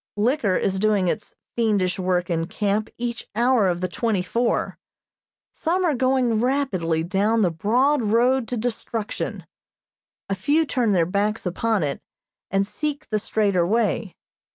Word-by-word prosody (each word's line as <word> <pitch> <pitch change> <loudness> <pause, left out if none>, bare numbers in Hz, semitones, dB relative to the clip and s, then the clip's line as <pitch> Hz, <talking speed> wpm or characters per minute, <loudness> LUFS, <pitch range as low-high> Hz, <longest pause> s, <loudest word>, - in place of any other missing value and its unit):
Liquor 220 -3 +1
is 190 0 0
doing 205 -3 +2
its 210 +5 -3 0.2
fiendish 205 -5 +1
work 180 -1 0
in 165 -2 -1
camp 210 +2 -1
each 240 0 -4
hour 240 -2 +3
of 175 -1 -1
the 185 - 0
twenty 205 0 -1
four. 235 +5 -1 0.7
Some 360 +3 0
are 320 - +2
going 255 -3 +2
rapidly 205 - 0
down 205 +5 +1
the 180 - +2
broad 245 - +2
road 235 +3 +2
to 245 - -3
destruction; 225 -1 -3 0.8
a 195 - -1
few 290 - +2
turn 245 -7 +1
their 170 -3 +3
backs 205 +5 -1
upon 205 +2 0
it, 140 -2 -3 0.5
and 195 +1 +1
seek 300 +6 -4
the 215 - +2
straighter 200 -4 +1
way. 210 0 0
215 Hz, 150 wpm, -23 LUFS, 190-245 Hz, 0.8 s, hour